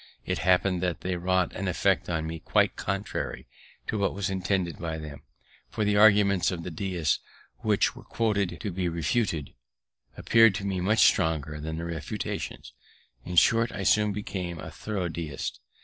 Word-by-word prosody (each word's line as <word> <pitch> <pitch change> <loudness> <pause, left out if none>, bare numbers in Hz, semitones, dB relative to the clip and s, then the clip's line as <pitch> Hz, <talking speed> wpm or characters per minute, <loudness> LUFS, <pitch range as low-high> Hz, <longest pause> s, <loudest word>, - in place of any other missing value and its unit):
It - - -1
happened 90 0 +2
that 90 -3 -1
they 90 0 -2
wrought 90 0 +1
an 100 - -4
effect 90 - +1
on 80 -2 -1
me 80 0 -5
quite - - +2
contrary 100 0 -3 0.4
to 110 - -2
what 100 -2 0
was 95 -1 -2
intended 95 -2 -1
by 80 -1 -3
them; 75 -2 -8 0.5
for 105 - -1
the 105 0 +2
arguments 100 -3 +5
of 85 -3 -4
the 90 - -5
Deists, 85 -3 -1 0.4
which - - +1
were - - -11
quoted 105 -5 -1
to 105 -4 -3
be 90 0 -1
refuted, 85 - -1 0.6
appeared 115 -3 +5
to 100 - -4
me 95 -2 -1
much 105 +5 +4
stronger 75 -2 +1
than 80 +1 -4
the 85 - -4
refutations; 80 -6 -5 0.5
in 90 - -5
short, 115 +5 +4
I 100 - -4
soon 105 +2 +3
became 95 -4 -4
a - - -8
thorough 100 -5 -3
Deist. 80 -7 -5
90 Hz, 170 wpm, -27 LUFS, 85-100 Hz, 0.6 s, arguments